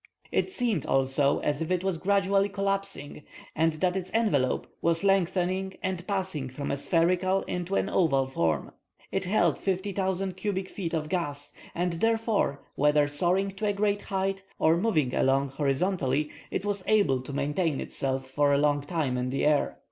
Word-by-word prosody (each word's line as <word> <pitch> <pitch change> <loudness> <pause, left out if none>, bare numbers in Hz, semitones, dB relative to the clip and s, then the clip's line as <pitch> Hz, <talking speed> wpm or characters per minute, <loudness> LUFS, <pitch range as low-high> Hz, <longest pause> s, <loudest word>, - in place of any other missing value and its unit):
It - - +1
seemed 240 - -1
also 135 +1 +2
as 145 0 -1
if 165 - -2
it 185 0 0
was 190 -4 -1
gradually 200 +1 +2
collapsing, 195 -6 -3 0.3
and 160 +1 +2
that 180 +4 0
its 185 -1 -3
envelope 170 - +1 0.2
was 165 +2 +1
lengthening 190 0 +1
and 185 -2 -3
passing 190 -9 -2
from 140 +3 -4
a 140 - -1
spherical 180 +5 +2
into 180 +2 -3
an - - +1
oval 140 -9 +2
form. 85 -12 -1 0.4
It 195 -1 -1
held 200 +4 +2
50,000 190 -1 -1
cubic 190 -1 -3
feet 170 -4 -4
of 155 -1 -2
gas, 145 -5 -3 0.2
and 175 0 0
therefore, 225 -5 0
whether 150 0 +3
soaring 180 +7 +1
to 215 - -1
a 205 - +2
great 205 0 0
height 195 0 -2 0.2
or 160 +1 +4
moving 170 - +1
along 135 +1 +2
horizontally, 145 +1 0 0.2
it - - -3
was 200 -2 -1
able 155 -12 +3
to 130 - -8
maintain 145 +2 0
itself 135 -1 -3
for 145 +2 +2
a 140 - +4
long 145 0 +2
time 145 -4 -1
in 125 0 -1
the 135 - 0
air. 150 -1 +2
175 Hz, 170 wpm, -28 LUFS, 145-195 Hz, 0.4 s, or